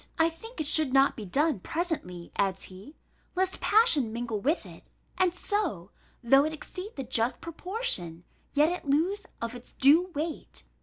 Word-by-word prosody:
I 325 0 +3
think 450 +8 -12
it 310 - -1
should 295 -2 +4
not 275 0 +5
be 215 - -7
done 290 - +1
presently," 240 - -4
adds 195 -1 0
he, 195 +11 -12 0.4
"lest 375 +1 +1
passion 370 - +4
mingle 230 -2 -3
with 300 - 0
it; - - -14 0.3
and 365 0 +3
so, 360 - -2 0.3
though 270 +4 +6
it 310 +1 -2
exceed 370 +6 -7
the 270 - -4
just 235 0 0
proportion, 335 - -3 0.3
yet 295 +2 +4
it 350 -5 -4
lose 355 +9 +1 0.2
of 230 +1 -3
its 245 0 -10
due 310 +7 +5
weight. 305 - -5
295 Hz, 165 wpm, -28 LUFS, 230-355 Hz, 0.4 s, though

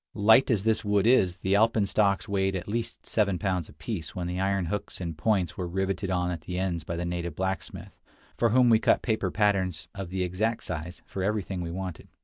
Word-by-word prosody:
Light 110 +5 +5
as 110 -6 +2
this 110 0 +2
wood 105 -1 +2
is, 95 -7 +4
the 95 +1 -1
alpenstocks 105 -1 +2
weighed 95 -1 0
at 90 - -4
least 115 +3 -3
seven 100 -4 +1
pounds 90 -4 -1
apiece 80 +3 -6
when 90 - -3
the 90 +1 -3
iron 95 -1 +1
hooks 105 +4 -4
and 85 -3 -4
points 90 +1 0
were 90 - -3
riveted 95 +2 -2
on 90 -1 0
at 85 -3 -5
the 90 +2 -5
ends 90 -3 -1
by 85 - -4
the 85 +1 -3
native 85 -2 -3
blacksmith, 95 +1 -4 0.4
for 115 - +2
whom 125 +1 +5
we 110 - +6
cut - - +3
paper 110 -5 0
patterns, 95 -4 0
of 95 -3 -6
the 95 0 -1
exact 105 +6 -1
size, 85 +1 -5
for 95 - -5
everything 100 -2 -1
we 85 - -4
wanted. 90 -1 -6
95 Hz, 210 wpm, -27 LUFS, 90-105 Hz, 0.4 s, we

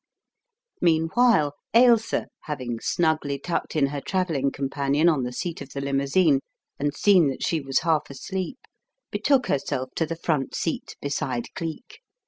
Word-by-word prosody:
Meanwhile, 165 0 +3 0.2
Ailsa, 235 -2 +4 0.2
having 130 -6 -4
snugly 155 -3 0
tucked 165 +4 -3
in 150 -3 +4
her 140 0 -3
travelling 165 -6 0
companion 140 +3 0
on 155 -5 +3
the 125 0 -3
seat 165 +6 -4
of - - -8
the 140 - -4
limousine, 140 +3 +2 0.4
and 145 +1 -1
seen 185 -7 +5
that 135 - -3
she 165 -2 0
was 135 -1 0
half 160 -3 +1
asleep, 190 - -5 0.5
betook 270 -3 +2
herself 130 -1 -2
to 160 - +1
the 165 - -3
front 155 -5 -1
seat 165 - -3
beside 140 -4 -2
Cleek. 165 +4 -6
150 Hz, 145 wpm, -25 LUFS, 140-175 Hz, 0.5 s, seen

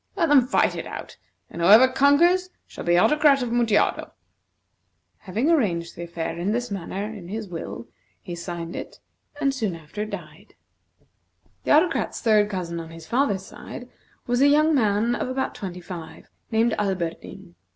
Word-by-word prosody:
Let 330 - +1
them 270 -4 +5
fight - - +2
it - - -5
out, - - -8 0.4
and 170 - -6
whoever 215 +9 +8
conquers 310 +8 +3 0.2
shall - - -9
be 175 0 +3
Autocrat 290 - +4
of 240 - -3
Mutjado." 235 -3 +1 1.1
Having 225 - +1
arranged 175 - 0
the - - -8
affair 165 -1 -4
in 195 +5 0
this 245 -1 -2
manner 195 +1 -4
in 210 -4 -7
his 215 +2 -5
will, 160 -9 -7 0.3
he 175 - -8
signed 170 0 -6
it, - - -8 0.4
and 275 -1 +1
soon 215 -9 -2
after 165 +6 -6
died. - - -10 1.1
The - - 0
Autocrat's 320 +4 +2
third 215 -2 +3
cousin 175 -4 -4
on 165 -1 -8
his 165 -1 -11
father's 220 - 0
side 245 +5 -10 0.4
was 245 +1 0
a 280 - +6
young 305 +2 +4
man 220 -2 +2
of 245 - -2
about 265 +1 -2
twenty 180 -2 -7
five, 170 -2 -10 0.2
named 225 0 +2
Alberdin. 190 -1 -4
210 Hz, 160 wpm, -24 LUFS, 175-260 Hz, 1.1 s, whoever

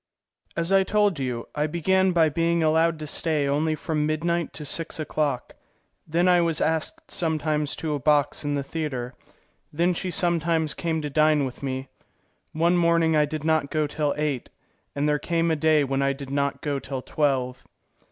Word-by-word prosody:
As 170 +2 0
I 195 0 +6
told 205 -3 +1
you, 125 -3 -3
I 150 +1 0
began 185 +4 +2
by 165 -2 +4
being 165 +2 +1
allowed 160 +1 +3
to 155 - -6
stay 150 -1 0
only 155 +3 +1
from 155 -2 -1
midnight 170 +2 -1
to 150 - -6
six 165 +3 -2
o'clock, 150 -4 -2 0.5
then 170 +3 +2
I 180 -1 +5
was 165 -2 0
asked 265 - -2
sometimes 155 -3 -1
to 155 -2 -3
a 145 - -2
box 145 +2 +2
in 145 0 -1
the 140 - -1
theatre, 135 -5 -4 0.6
then 170 +4 +1
she 185 +2 -3
sometimes 165 -3 +1
came 160 -2 -2
to 150 - -2
dine 155 -1 +3
with 130 - -7
me. 130 -1 -3 0.6
One 170 +3 +2
morning 170 -1 +3
I 150 -1 +4
did 155 0 -5
not 155 -3 +1
go 155 -1 0
till 150 0 -1
eight, 150 -5 -2 0.5
and 145 +1 0
there 150 0 +2
came 165 0 0
a - - +2
day 155 -1 +3
when 135 0 -1
I 140 0 +2
did 135 -1 -8
not 140 0 -1
go 145 -2 -1
till 135 -1 -5
twelve. 130 -4 -1
155 Hz, 185 wpm, -25 LUFS, 145-165 Hz, 0.6 s, I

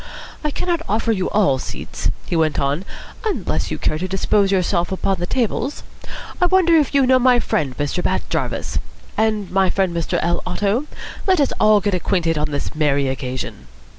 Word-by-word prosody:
"I 300 - +1
cannot 340 +3 -1
offer 225 +2 +1
you 190 -4 0
all 145 -11 +2
seats," - - -4 0.2
he - - -2
went 160 -2 +2
on, 145 +6 -1 0.4
"unless 435 -3 -1
you - - -3
care 155 - -1
to 185 - -2
dispose 195 +1 +2
yourselves 180 -1 +1
upon 190 0 0
the 175 - -2
tables. 250 +4 -1 0.6
I 360 - +5
wonder 355 -2 +4
if 295 -3 +2
you 275 -1 +5
know 255 0 +5
my 250 0 +5
friend, 145 - -1
Mr. 145 +5 -1
Bat - - -1
Jarvis? - - -2 0.4
And 215 -3 0
my 190 0 +3
friend, 190 -3 0
Mr. 170 -1 -1
L. 175 0 0
Otto? 205 +9 -1 0.4
Let 375 -3 +4
us 280 - +2
all 215 -1 +5
get 205 0 0
acquainted 175 -2 +1
on 150 0 -1
this 145 -1 -3
merry 145 -3 +1
occasion." 130 - -5
190 Hz, 185 wpm, -20 LUFS, 160-240 Hz, 0.6 s, I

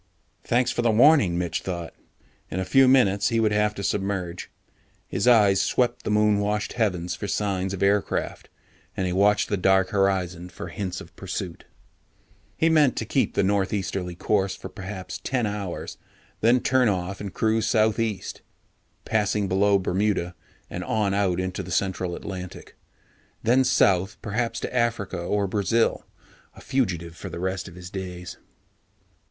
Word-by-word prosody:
Thanks 120 +1 +1
for - - -1
the 120 - +2
warning, 115 - +5
Mitch 85 -1 -2
thought. 85 -3 -5 0.6
In 95 - -3
a 95 - -1
few 135 +4 +5
minutes, 100 -6 +4
he 115 -1 +1
would 110 -1 +2
have 105 0 +1
to 100 - -5
submerge. 95 -3 -2 0.6
His 110 - -1
eyes 105 -5 +5
swept 125 -1 +1
the - - -4
moon 105 -1 +3
washed 105 +1 -1
heavens 90 -7 -1
for 100 - -5
signs 95 -2 -1
of 100 -1 -3
aircraft, 100 +1 0 0.5
and 95 - 0
he 90 - -1
watched 100 +2 +3
the 100 - -1
dark 95 0 +3
horizon 95 -3 0
for - - -8
hints 95 -3 -4
of 85 - -14
pursuit. 95 -2 -6 0.9
He 160 - +3
meant 150 -6 +4
to - - -2
keep - - 0
the - - +2
northeasterly 95 -2 -1
course 95 +1 0
for - - -9
perhaps 95 -1 -7
ten 125 -3 0
hours, 100 -4 -5 0.4
then 120 +3 +4
turn 130 -2 +3
off 95 0 -3
and 100 -2 -5
cruise 110 +2 +1
southeast, 110 -2 0 0.6
passing 105 -2 0
below 100 +2 +3
Bermuda 95 -1 0 0.3
and 90 - -5
on 105 0 0
out 95 -3 +1
into 95 +1 -3
the 95 - -9
central 95 -1 -1
Atlantic. 90 -2 -8 0.7
Then 125 +4 +4
south 100 -7 +2
perhaps 115 +1 -2
to - - -5
Africa 115 -6 0
or 100 +3 0
Brazil. 105 +4 0 0.5
A - - -13
fugitive 85 -10 -1
for 95 - -8
the 85 - -7
rest 95 +1 -3
of 90 - -12
his 90 0 -10
days. 90 -3 -6
100 Hz, 160 wpm, -25 LUFS, 95-110 Hz, 0.9 s, warning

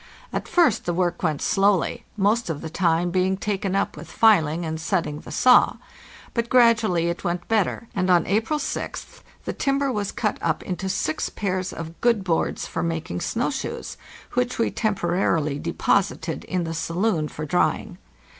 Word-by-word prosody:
At - - -3
first 330 - +3
the 175 - -1
work 175 -1 0
went 155 -5 0
slowly, 195 -2 +2
most 210 +2 +2
of 150 -3 -3
the 160 - -6
time 175 0 +1
being 185 +1 +1
taken 195 -1 -2
up 195 - 0
with - - -10
filing 170 -7 +3
and 160 0 -4
setting 160 -4 -1
the - - -12
saw; 250 -1 +5 0.6
but 235 0 -1
gradually 230 -8 +4
it 170 0 -3
went 175 0 -2
better, 225 0 0
and 185 -1 0
on 175 -1 +4
April 220 - +1
6th - - -5 0.2
the - - -2
timber 275 0 0
was 205 -4 -2
cut 210 -3 -2
up 160 -2 -1
into 190 +1 -3
six 170 -5 -1
pairs 185 -2 -2
of 165 0 -8
good 235 -4 +3
boards 170 -3 0
for 165 - -3
making 160 - -3
snow 240 +5 -1
shoes, 270 - -5 0.4
which 250 0 0
we 230 - +1
temporarily 175 -8 0
de 170 +3 -3
posited 175 -5 0
in 180 -1 -1
the 165 0 -3
saloon 165 0 0
for 155 +1 -6
drying. 175 +4 0
185 Hz, 175 wpm, -24 LUFS, 165-215 Hz, 0.6 s, saw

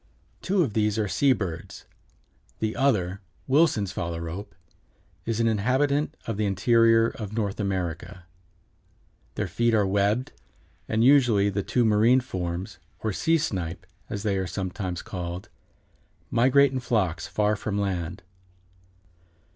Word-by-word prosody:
Two 190 -1 +2
of 125 -9 -3
these 105 -1 +1
are 105 -2 0
sea 140 +7 +3
birds. 95 -9 -4 0.7
The 110 0 -2
other, 100 -8 +1 0.2
Wilson's 130 - +2
phalarope, 85 0 -5 0.7
is 115 -1 -1
an 115 - +3
inhabitant 130 +7 +1
of 115 -3 -3
the 105 -1 0
interior 115 +4 +4
of 110 -6 -7
North 105 -3 -2
America. 90 -2 -3 1.1
Their - - -1
feet 120 -1 +1
are 105 -2 +3
webbed, 100 +6 +1 0.6
and 110 +1 +2
usually 120 -7 +5
the 100 +1 -1
two 115 +5 +1
marine 110 +4 +4
forms, 95 -4 -5 0.2
or 110 -2 -1
sea 165 +11 +2
snipe, 95 - -3 0.2
as 100 0 -4
they 100 -3 0
are 95 -1 -2
sometimes 95 -1 -4
called, 90 0 -6 0.8
migrate 135 +3 +4
in 130 - -2
flocks 95 -9 -1
far 105 +3 +1
from 100 0 -3
land. 90 -2 -3
105 Hz, 130 wpm, -26 LUFS, 95-115 Hz, 1.1 s, usually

